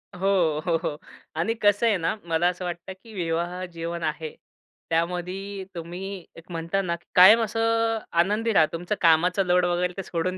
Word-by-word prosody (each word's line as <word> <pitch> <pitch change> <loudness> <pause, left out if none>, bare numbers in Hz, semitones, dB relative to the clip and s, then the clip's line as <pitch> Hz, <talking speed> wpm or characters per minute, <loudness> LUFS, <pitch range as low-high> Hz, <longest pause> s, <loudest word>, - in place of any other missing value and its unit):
हो, 180 -5 +1
हो, 170 -2 +2
हो 150 - -2 0.4
आणि 200 +7 +1
कसं 205 +2 +4
आहे 215 -3 +3
ना, 165 +2 -1
मला 165 +1 +1
असं 180 0 -5
वाटतं 175 +1 -5
की 225 - -13
विवाह 175 0 -2
जीवन 170 0 -5
आहे. 155 0 -3 0.5
त्यामध्ये 180 +4 -2
तुम्ही 180 +2 -6
एक 165 +2 -14
म्हणता 170 +3 -1
ना, 170 -3 -2
की 170 - -17
कायम 195 +6 +9
असं 225 +1 +1 0.2
आनंदी 215 +5 0
राहा. 160 - +6
तुमचा 175 +5 -2
कामाचा 175 +3 +4
लोड 180 0 +3
वगैरे 175 +1 0
ते 195 - -3
सोडून 185 +2 -2
180 Hz, 175 wpm, -25 LUFS, 170-195 Hz, 0.5 s, कायम